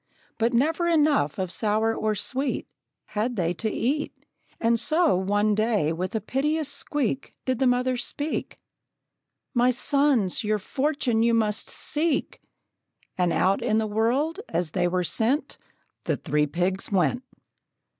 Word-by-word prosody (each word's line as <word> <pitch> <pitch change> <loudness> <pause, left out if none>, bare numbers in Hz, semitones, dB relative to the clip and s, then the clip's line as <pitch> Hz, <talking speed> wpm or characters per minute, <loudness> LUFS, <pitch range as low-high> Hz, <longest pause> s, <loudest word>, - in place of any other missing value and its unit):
But 235 +2 +2
never 320 +7 +2
enough 300 - +2
of 185 -2 -2
sour 220 +2 +1
or 215 -1 0
sweet 265 +7 -2 0.4
Had 230 +4 -1
they 175 -4 0
to 220 +4 -2
eat; 280 +8 -1 0.5
And 230 0 +2
so, 315 - +3
one 205 +3 +1
day, 210 -7 +1
with 185 +6 -4
a - - +2
piteous 295 +7 -1
squeak, 280 -3 -2 0.2
Did 255 -2 0
the 265 - +3
mother 250 +1 +1
speak: 295 +5 -3 1.0
"My 245 -1 +3
sons, 255 - +2
your 215 0 +1
fortune 265 +1 0
you 230 0 +3
must 215 -1 0
seek!" 305 -1 -1 0.7
And 180 -2 +1
out 195 +5 +2
in 225 -2 +1
the 220 - +1
world, 245 - 0
as 170 -3 -1
they 175 0 +1
were 180 +1 0
sent, 230 - 0 0.5
The - - 0
three 150 0 0
pigs 180 +6 -1
went. 195 +6 +2
230 Hz, 145 wpm, -25 LUFS, 200-275 Hz, 1.0 s, so